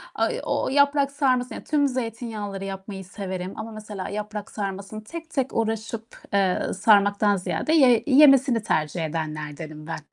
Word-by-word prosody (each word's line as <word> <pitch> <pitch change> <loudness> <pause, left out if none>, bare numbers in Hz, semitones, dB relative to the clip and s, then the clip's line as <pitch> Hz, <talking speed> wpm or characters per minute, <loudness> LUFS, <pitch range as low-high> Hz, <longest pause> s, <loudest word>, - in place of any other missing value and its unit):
Ay - - 0
o - - -1
o - - -1
yaprak 280 0 +3
sarması, 255 -3 +1
yani, - - -7
tüm 290 -2 +2
zeytinyağlıları 225 -5 -4
yapmayı 195 0 -7
severim 185 -1 -5
ama 220 +1 -6
mesela 210 -3 -7
yaprak 210 0 -5
sarmasını 200 +1 -5
tek 330 +7 -8
tek 270 -4 -1
uğraşıp, 225 0 -2 0.3
eee, 195 -2 +2
sarmaktan 205 0 +4
ziyade 250 - -1
ye 255 -7 +5
yemesini 270 -4 +6
tercih 155 -2 0
edenlerdenim 155 -1 -5
ben. 165 - -4
210 Hz, 150 wpm, -24 LUFS, 190-255 Hz, 0.3 s, yemesini